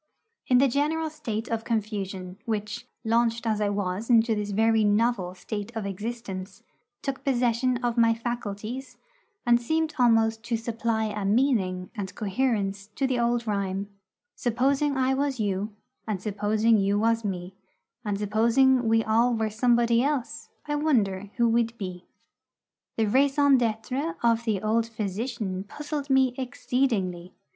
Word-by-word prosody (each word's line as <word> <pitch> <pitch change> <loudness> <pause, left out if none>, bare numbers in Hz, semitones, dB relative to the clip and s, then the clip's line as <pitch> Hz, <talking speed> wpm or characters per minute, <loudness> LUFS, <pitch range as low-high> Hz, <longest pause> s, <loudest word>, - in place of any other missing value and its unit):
In 250 - +5
the 275 +2 +5
general 305 +4 0
state 230 -8 -4
of 225 -1 -2
confusion 195 -4 -3
which, 210 -2 -3 0.2
launched 230 0 +1
as 215 -2 0
I 205 - +2
was 200 +2 -2
into 230 -1 +5
this 210 -1 -2
very 220 +2 +3
novel 205 -3 +1
state 205 +3 -5
of 220 -3 -3
existence, 195 -2 -6 0.4
took 270 -1 -3
possession 250 -2 +1
of 240 0 0
my 230 -1 +5
faculties, 235 +2 -5 0.5
and 240 0 +4
seemed 315 +5 0
almost 225 -2 +3
to 230 0 0
supply 230 0 -1
a 210 -1 -3
meaning 195 -5 +1
and 200 -4 -6
coherence 200 -3 -1
to 275 - 0
the 255 -2 0
old 235 0 +1
rhyme, 200 -1 -2 0.5
Supposing 270 +4 +1
I 260 0 +2
was 275 -1 -1
you, 205 0 -1 0.4
And 210 -3 -1
supposing 210 +2 +2
you 200 +1 +2
was 230 +1 +2
me, 185 -2 -4 0.5
And 205 -3 -1
supposing 235 +5 +3
we 225 0 +3
all 230 +3 +3
were 220 -1 -1
somebody 235 +1 +3
else, 275 -3 -2 0.2
I 295 -1 -1
wonder 205 -10 +1
who 235 -1 +3
we'd 230 0 +1
be! 180 -3 -6 0.9
the 225 - +2
raison 275 +4 +4
d'être 250 +8 -2
of 230 0 +2
the 215 -4 0
old 225 +1 +1
physician 215 -2 -3
puzzled 295 +5 -5
me 265 -2 +4
exceedingly. 240 -9 -1
225 Hz, 145 wpm, -26 LUFS, 205-250 Hz, 0.9 s, In